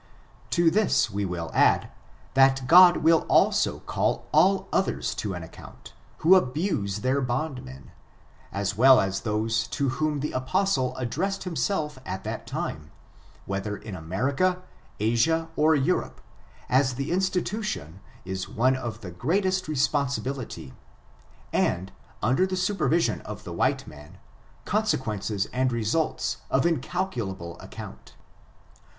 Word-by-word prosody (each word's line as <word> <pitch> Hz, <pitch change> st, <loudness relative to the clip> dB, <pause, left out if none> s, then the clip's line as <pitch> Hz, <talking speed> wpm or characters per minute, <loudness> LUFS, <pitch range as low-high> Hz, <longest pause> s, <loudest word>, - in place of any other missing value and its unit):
To 170 Hz, -2 st, +3 dB
this 205 Hz, -, +2 dB
we 100 Hz, 0 st, -2 dB
will 85 Hz, -3 st, -4 dB
add, -, -, +3 dB, 0.4 s
that 135 Hz, -1 st, +4 dB
God 175 Hz, +5 st, +8 dB
will 165 Hz, 0 st, +6 dB
also -, -, +3 dB
call -, -, -1 dB
all 195 Hz, 0 st, +3 dB
others 190 Hz, -, 0 dB
to 100 Hz, -3 st, -4 dB
an 90 Hz, -, -6 dB
account, 80 Hz, -, -13 dB, 0.3 s
who 175 Hz, -, +8 dB
abuse 130 Hz, -, +1 dB
their 130 Hz, +2 st, +1 dB
bondmen, 125 Hz, -, -4 dB, 0.6 s
as 100 Hz, 0 st, -2 dB
well 130 Hz, +4 st, +7 dB
as 95 Hz, 0 st, 0 dB
those 110 Hz, +1 st, -1 dB
to 140 Hz, +3 st, -1 dB
whom 150 Hz, +1 st, -1 dB
the 150 Hz, -, -2 dB
apostle 130 Hz, +1 st, 0 dB
addressed 170 Hz, +11 st, -2 dB
himself 155 Hz, -5 st, -2 dB
at 95 Hz, -4 st, -5 dB
that -, -, -5 dB
time, 75 Hz, -1 st, -4 dB, 0.6 s
whether 100 Hz, +1 st, -3 dB
in 110 Hz, -, -9 dB
America, 135 Hz, -, -1 dB, 0.4 s
Asia, 120 Hz, +10 st, +1 dB
or 155 Hz, +1 st, +4 dB
Europe, 135 Hz, -2 st, 0 dB, 0.5 s
as 130 Hz, 0 st, +2 dB
the 135 Hz, +4 st, -3 dB
institution 185 Hz, -, -2 dB, 0.3 s
is 95 Hz, 0 st, -4 dB
one 130 Hz, +4 st, +2 dB
of 120 Hz, -3 st, -5 dB
the 90 Hz, -, -7 dB
greatest 185 Hz, -, 0 dB
responsibility, 140 Hz, -, -2 dB, 0.8 s
and, 95 Hz, +2 st, 0 dB, 0.3 s
under 130 Hz, -, +3 dB
the 185 Hz, 0 st, -3 dB
supervision 185 Hz, -3 st, +1 dB
of -, -, -8 dB
the -, -, -7 dB
white -, -, 0 dB
man, 75 Hz, +1 st, -13 dB, 0.5 s
consequences 110 Hz, -, -1 dB
and 130 Hz, 0 st, +1 dB
results 115 Hz, +7 st, -1 dB
of -, -, +2 dB
incal 175 Hz, +4 st, -1 dB
culable 95 Hz, -7 st, -5 dB
amount. -, -, -10 dB
130 Hz, 130 wpm, -26 LUFS, 105-170 Hz, 0.8 s, God